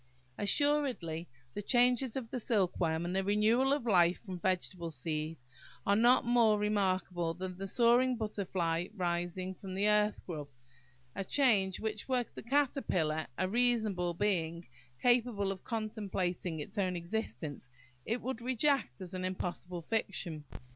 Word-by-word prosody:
Assuredly, 240 Hz, -, +1 dB, 0.2 s
the -, -, -4 dB
changes 245 Hz, +2 st, +3 dB
of 240 Hz, -4 st, -5 dB
the 250 Hz, -, -2 dB
silkworm, 175 Hz, -7 st, +1 dB
and 180 Hz, +2 st, -2 dB
the 195 Hz, -, +1 dB
renewal 215 Hz, +6 st, +3 dB
of 285 Hz, -4 st, 0 dB
life 180 Hz, -5 st, +4 dB
from 185 Hz, -4 st, -7 dB
vegetable 180 Hz, -2 st, -1 dB
seed, 155 Hz, +2 st, -3 dB, 0.5 s
are 200 Hz, -, +4 dB
not 240 Hz, +4 st, +5 dB
more 235 Hz, -3 st, +4 dB
remarkable 185 Hz, -5 st, 0 dB
than 185 Hz, 0 st, -5 dB
the 195 Hz, +2 st, -5 dB
soaring 245 Hz, +4 st, +4 dB
butterfly 185 Hz, -6 st, -1 dB
rising 175 Hz, 0 st, -2 dB
from 185 Hz, 0 st, -8 dB
the 200 Hz, +2 st, +2 dB
earth 210 Hz, 0 st, +3 dB
grub–a 130 Hz, -2 st, -9 dB
change 205 Hz, -7 st, +3 dB
which, 215 Hz, +2 st, -3 dB
were 250 Hz, -2 st, +1 dB
the -, -, -7 dB
caterpillar 225 Hz, -, 0 dB
a 185 Hz, -, +1 dB
reasonable 215 Hz, -6 st, +1 dB
being, 170 Hz, -4 st, -1 dB, 0.4 s
capable 240 Hz, -5 st, +2 dB
of 190 Hz, -1 st, -7 dB
contemplating 195 Hz, -6 st, -2 dB
its 195 Hz, +8 st, -5 dB
own 185 Hz, -2 st, 0 dB
existence, 160 Hz, -, -4 dB, 0.3 s
it 230 Hz, +3 st, -2 dB
would 255 Hz, -2 st, -3 dB
reject 255 Hz, -, +1 dB
as 180 Hz, -1 st, -6 dB
an 185 Hz, 0 st, -3 dB
impossible 180 Hz, -1 st, -4 dB
fiction. 175 Hz, -6 st, -1 dB
195 Hz, 140 wpm, -33 LUFS, 175-230 Hz, 0.5 s, not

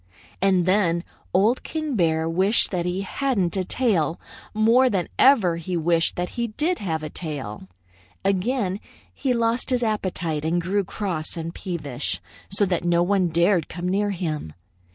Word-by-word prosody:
"And 185 Hz, -2 st, +3 dB
then 180 Hz, -3 st, +2 dB, 0.3 s
Old 210 Hz, +7 st, +3 dB
King 310 Hz, -4 st, -3 dB
Bear 160 Hz, -4 st, +2 dB
wished 190 Hz, +7 st, +2 dB
that 180 Hz, -2 st, -1 dB
he 180 Hz, +2 st, -1 dB
hadn't 200 Hz, -3 st, -1 dB
a 190 Hz, -, 0 dB
tail 180 Hz, -, 0 dB, 0.3 s
more 230 Hz, +4 st, +4 dB
than 190 Hz, -6 st, 0 dB
ever 215 Hz, -11 st, +5 dB
he 175 Hz, +2 st, -3 dB
wished 165 Hz, 0 st, +2 dB
that 180 Hz, 0 st, -2 dB
he 235 Hz, -1 st, -2 dB
did 305 Hz, +11 st, -1 dB
have 160 Hz, -5 st, -2 dB
a 155 Hz, -, -4 dB
tail. 135 Hz, -, -6 dB, 0.6 s
Again 195 Hz, 0 st, 0 dB, 0.3 s
he 270 Hz, -, -1 dB
lost 235 Hz, +1 st, +1 dB
his 250 Hz, -2 st, +1 dB
appetite 180 Hz, -8 st, -1 dB
and 165 Hz, +2 st, +1 dB
grew 195 Hz, +4 st, 0 dB
cross 175 Hz, -5 st, -4 dB
and 165 Hz, 0 st, -4 dB
peevish, 150 Hz, -10 st, -4 dB, 0.3 s
so 200 Hz, +1 st, +2 dB
that 180 Hz, -3 st, -1 dB
no 175 Hz, 0 st, +3 dB
one 190 Hz, 0 st, +2 dB
dared 170 Hz, +1 st, +2 dB
come 175 Hz, 0 st, -4 dB
near 200 Hz, +3 st, +1 dB
him. 155 Hz, -, -3 dB
185 Hz, 160 wpm, -24 LUFS, 170-210 Hz, 0.6 s, ever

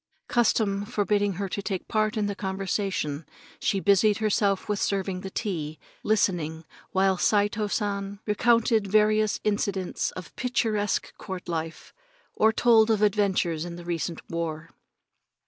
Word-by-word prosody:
Custom 215 Hz, -4 st, +2 dB
forbidding 205 Hz, -2 st, 0 dB
her 195 Hz, +2 st, -3 dB
to 200 Hz, -, -4 dB
take 195 Hz, -2 st, -4 dB
part 215 Hz, 0 st, 0 dB
in 210 Hz, -, +1 dB
the 205 Hz, -, -1 dB
conversation, 190 Hz, -6 st, -2 dB, 0.4 s
she 200 Hz, -3 st, +1 dB
busied 200 Hz, +2 st, +4 dB
herself 205 Hz, -2 st, +1 dB
with 210 Hz, -1 st, -1 dB
serving 190 Hz, -2 st, -1 dB
the 190 Hz, -, -6 dB
tea, 165 Hz, -8 st, -3 dB, 0.2 s
listening 165 Hz, -7 st, 0 dB, 0.2 s
while 190 Hz, -1 st, +2 dB
Saito 210 Hz, 0 st, +2 dB
San 200 Hz, -1 st, -2 dB
recounted 225 Hz, 0 st, +2 dB
various 215 Hz, +1 st, +3 dB
incidents 200 Hz, -3 st, -1 dB
of 185 Hz, -, -7 dB
the -, -, -17 dB
picturesque 220 Hz, -4 st, -1 dB
court 190 Hz, -2 st, -7 dB
life, 165 Hz, -1 st, -5 dB, 0.4 s
or 220 Hz, +1 st, +4 dB
told 225 Hz, -1 st, +4 dB
of 215 Hz, -1 st, +2 dB
adventures 190 Hz, -6 st, +1 dB
in 170 Hz, 0 st, -6 dB
the 175 Hz, 0 st, -10 dB
recent 170 Hz, -1 st, -3 dB
war. 165 Hz, -1 st, -4 dB
200 Hz, 140 wpm, -26 LUFS, 185-215 Hz, 0.4 s, busied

